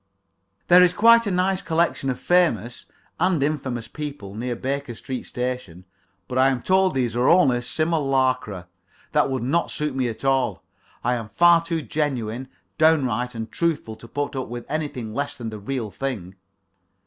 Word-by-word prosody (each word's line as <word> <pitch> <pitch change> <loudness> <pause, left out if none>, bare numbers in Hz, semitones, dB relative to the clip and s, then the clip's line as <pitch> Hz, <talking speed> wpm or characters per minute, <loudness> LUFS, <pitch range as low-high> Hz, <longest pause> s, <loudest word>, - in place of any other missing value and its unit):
There 180 +1 +8
is 180 -1 +5
quite 230 +1 +6
a - - +1
nice 185 0 +1
collection 160 -4 0
of 125 - -2
famous 125 - +1 0.3
and 175 -4 +2
infamous 130 -6 -2
people 145 -10 -7
near 120 +3 -3
Baker 135 0 -3
Street 130 +3 -6
Station, 125 -8 -4 0.4
but 125 - -1
I 135 +1 +5
am 130 -3 -2
told 190 -3 +3
these 120 -3 0
are 120 +1 +3
only 130 -9 +4
simulacra. 130 - 0 0.4
That - - +2
would 130 -3 -2
not 155 +7 +1
suit 150 -2 -2
me 130 -2 0
at 115 +4 -7
all. 135 -1 +1 0.4
I 125 - +2
am 115 -3 -4
far 170 +6 +5
too 165 -2 -2
genuine, 130 -5 -2 0.3
downright, 130 -6 +2
and 110 0 -5
truthful 155 -10 -1
to 115 - -13
put 145 +3 -3
up 130 - -3
with 120 0 -7
anything 140 -8 -3
less 140 +2 -3
than 115 -3 -5
the 110 - -7
real 115 0 -4
thing. 100 -5 -4
130 Hz, 170 wpm, -23 LUFS, 120-155 Hz, 0.4 s, There